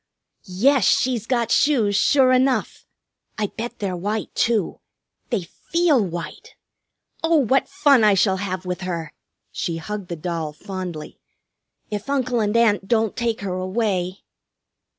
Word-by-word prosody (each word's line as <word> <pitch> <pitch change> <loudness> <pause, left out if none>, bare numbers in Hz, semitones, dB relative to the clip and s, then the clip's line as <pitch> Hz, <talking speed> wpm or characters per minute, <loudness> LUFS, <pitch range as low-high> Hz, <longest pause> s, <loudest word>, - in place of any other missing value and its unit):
"Yes, 240 +9 +2
she's 240 -4 +1
got 240 -3 0
shoes, 235 -9 +3
sure 260 +4 +4
enough! 255 0 +1 0.5
I 210 -2 -2
bet 240 +1 -5
they're 195 -3 -3
white, 205 +5 -3
too. 225 -5 0 0.5
They 230 -7 -1
feel 315 - +1
white. 180 - -7 0.7
Oh, 325 +1 +3
what 270 -1 +2
fun 275 -6 +4
I 210 -2 +5
shall 190 0 +2
have 185 -1 -4
with 180 0 -4
her," 170 -4 -4 0.4
she 165 -1 -3
hugged 205 +3 -6
the 170 - -4
doll 165 -2 -4
fondly, 180 -3 -7 0.7
"if 210 +4 -4
Uncle 255 -3 0
and 210 +1 +1
Aunt 210 -4 +2
don't 220 -1 +1
take 230 -3 -1
her 195 -2 -3
away!" 185 -1 -2
210 Hz, 140 wpm, -22 LUFS, 185-245 Hz, 0.7 s, I